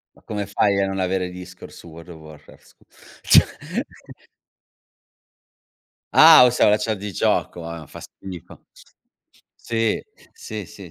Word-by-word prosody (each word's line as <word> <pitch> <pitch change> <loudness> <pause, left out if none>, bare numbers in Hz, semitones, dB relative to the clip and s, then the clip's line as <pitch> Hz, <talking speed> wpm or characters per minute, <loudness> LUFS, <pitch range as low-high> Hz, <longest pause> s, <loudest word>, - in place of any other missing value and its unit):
Ma - - -24
come 105 -2 -5
fai 100 0 +1
a 95 - 0
non 95 0 -4
avere 90 0 -1
Discord 90 0 -11
su - - -14
World 85 +2 -13
of 80 - -11
Warcraft, 75 -1 -16
scu - - -25 0.4
cioè! - - +6 2.7
Ah 125 - +9
us 125 - -2
la 105 +1 +4
chat 110 0 -2
di 100 +1 -7
gioco, 85 -1 -1
ah 85 -2 -8
fa - - -12
schifo. 95 -3 -12 0.9
Sì, 115 -1 -2 0.3
sì, 460 0 -8
sì, - - -13
95 Hz, 140 wpm, -21 LUFS, 85-105 Hz, 2.7 s, Ah